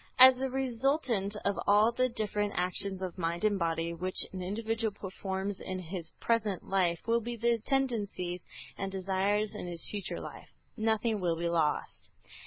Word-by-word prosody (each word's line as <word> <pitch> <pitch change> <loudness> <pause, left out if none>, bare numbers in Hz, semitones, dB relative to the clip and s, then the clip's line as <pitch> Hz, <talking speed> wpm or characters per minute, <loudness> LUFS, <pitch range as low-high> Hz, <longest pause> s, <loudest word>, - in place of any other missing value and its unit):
As 260 0 +9
a 265 - 0
resultant 255 -5 0
of 200 0 +1
all 210 +3 +6
the 255 +2 +1
different 210 -3 -1
actions 185 +2 -1
of 185 -1 -5
mind 170 +2 -1
and 205 -2 +3
body 165 0 0
which 185 +2 +1
an 185 - -4
individual 225 +4 -1
performs 195 0 -4
in 185 - -4
his 175 -1 -5
present 215 -5 +1
life, 180 -3 +1
will 230 +1 +2
be 240 +2 -4
the 235 0 +1
tendencies 205 -10 0 0.4
and 195 -1 -2
desires 195 +3 0
in 210 -4 -5
his 170 -1 -3
future 205 -3 -3
life; - - -9 0.3
nothing 220 -1 +1
will 175 -3 +1
be 170 +1 -1
lost. 160 -3 0
200 Hz, 165 wpm, -31 LUFS, 180-230 Hz, 0.4 s, As